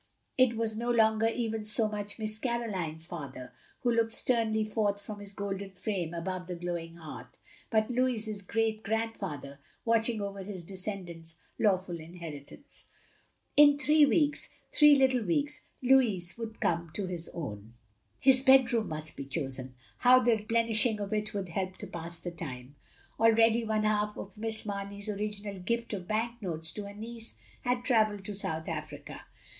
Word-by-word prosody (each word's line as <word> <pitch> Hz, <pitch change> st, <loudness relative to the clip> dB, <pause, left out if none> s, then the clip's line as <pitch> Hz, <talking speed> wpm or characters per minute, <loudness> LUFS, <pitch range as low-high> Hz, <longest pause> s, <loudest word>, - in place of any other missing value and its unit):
It 255 Hz, -3 st, +4 dB
was 225 Hz, -1 st, 0 dB
no 235 Hz, +2 st, -2 dB
longer 220 Hz, -1 st, +4 dB
even 225 Hz, -2 st, -1 dB
so 215 Hz, +1 st, +1 dB
much 205 Hz, -1 st, -5 dB
Miss 215 Hz, -1 st, -2 dB
Caroline's 195 Hz, -11 st, -2 dB
father 135 Hz, -7 st, -7 dB, 0.3 s
who 245 Hz, -, +2 dB
looked 230 Hz, -1 st, +2 dB
sternly 225 Hz, -3 st, +1 dB
forth 210 Hz, -2 st, 0 dB
from 205 Hz, +1 st, -8 dB
his 200 Hz, -1 st, -6 dB
golden 200 Hz, -1 st, -4 dB
frame 185 Hz, -3 st, -2 dB
above 180 Hz, +1 st, -4 dB
the 180 Hz, -, -4 dB
glowing 170 Hz, -1 st, -4 dB
hearth; 160 Hz, -3 st, -10 dB, 0.3 s
but 220 Hz, +1 st, +2 dB
Louis's 230 Hz, -4 st, 0 dB
great 220 Hz, +2 st, 0 dB
grandfather 195 Hz, -11 st, -3 dB, 0.3 s
watching 230 Hz, 0 st, +2 dB
over 200 Hz, -1 st, -4 dB
his 190 Hz, -2 st, -6 dB
descendant's 175 Hz, -3 st, -6 dB, 0.2 s
law 205 Hz, -4 st, +5 dB
ful 180 Hz, -2 st, -7 dB
inheritance. 165 Hz, -, -10 dB, 0.7 s
In 290 Hz, -1 st, +8 dB
three 300 Hz, 0 st, +5 dB
weeks, 295 Hz, -1 st, +2 dB
— -, -, -37 dB
^three 295 Hz, -1 st, +8 dB
little 260 Hz, -3 st, +3 dB
weeks 290 Hz, +11 st, 0 dB
— -, -, -28 dB
^Lotds 235 Hz, -9 st, +3 dB
would 225 Hz, -1 st, -6 dB
come 170 Hz, 0 st, 0 dB
to 205 Hz, -, -1 dB
his 175 Hz, -2 st, -4 dB
own! 115 Hz, -8 st, -7 dB, 0.4 s
His 260 Hz, -1 st, +6 dB
bedroom 255 Hz, -4 st, +5 dB
must 155 Hz, 0 st, -5 dB
be 140 Hz, -, -6 dB
chosen. 135 Hz, -3 st, -4 dB, 0.2 s
How 255 Hz, +1 st, +7 dB
the 235 Hz, -3 st, +3 dB
plenish 225 Hz, +1 st, +3 dB
ing 220 Hz, -3 st, -2 dB
of 205 Hz, 0 st, -3 dB
it 215 Hz, 0 st, 0 dB
would 195 Hz, -3 st, -3 dB
help 185 Hz, +2 st, -3 dB
to -, -, -7 dB
pass 170 Hz, 0 st, -6 dB
the 175 Hz, -, -5 dB
time. 140 Hz, -5 st, -7 dB, 0.4 s
Already 225 Hz, +1 st, +5 dB
one 215 Hz, -1 st, +1 dB
half 210 Hz, 0 st, +1 dB
of 195 Hz, -1 st, -8 dB
Miss 220 Hz, 0 st, -3 dB
Mamey's 200 Hz, 0 st, -5 dB
original 205 Hz, -1 st, -3 dB
gift 235 Hz, +5 st, -2 dB
of 185 Hz, -3 st, -4 dB
bank 230 Hz, +2 st, -1 dB
notes 165 Hz, -4 st, -1 dB
to 205 Hz, -1 st, -5 dB
her 200 Hz, -, -8 dB
niece 230 Hz, +1 st, -6 dB, 0.3 s
had 245 Hz, 0 st, 0 dB
travelled 215 Hz, -5 st, +2 dB
to 210 Hz, -, -3 dB
South 160 Hz, -5 st, -3 dB
Africa. 155 Hz, -3 st, -6 dB
210 Hz, 170 wpm, -30 LUFS, 175-230 Hz, 0.7 s, In